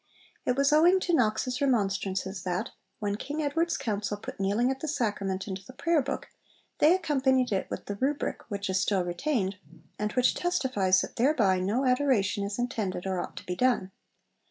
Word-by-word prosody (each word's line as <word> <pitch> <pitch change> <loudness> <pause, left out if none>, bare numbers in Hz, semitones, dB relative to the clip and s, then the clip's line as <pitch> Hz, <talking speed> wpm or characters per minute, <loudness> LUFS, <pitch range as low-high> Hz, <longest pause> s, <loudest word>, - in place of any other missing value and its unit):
It 250 - +3
was 275 +1 +3
owing 345 +5 +6
to 350 - 0
Knox's 250 0 +1
remonstrances 195 -6 0
that, 180 0 -2 0.3
when 205 -1 -2
King 290 +7 -5
Edward's 325 +4 0
Council 210 -5 -2
put 205 - -9
kneeling 205 +6 +2
at 265 - -4
the 315 - -4
Sacrament 205 -9 -1
into 190 -1 -5
the 255 - -13
Prayer 335 +2 +2
Book, - - -4 0.5
they 315 +4 +6
accompanied 265 -7 +1
it 195 - -1
with - - -5
the 205 - -5
Rubric, 280 +5 -1
which 200 -1 -3
is 190 0 +1
still 195 -1 +1
retained, 195 - -1 0.4
and 210 0 -1
which 250 -1 +3
testifies 230 - +2
'that - - -7
thereby 225 -8 +3
no 210 +9 0
adoration 250 -7 +2
is 200 0 -3
intended 220 -7 -2
or 190 -1 -1
ought - - -6
to - - -8
be 180 - -3
done.' 240 -5 +1
220 Hz, 180 wpm, -28 LUFS, 195-275 Hz, 0.5 s, owing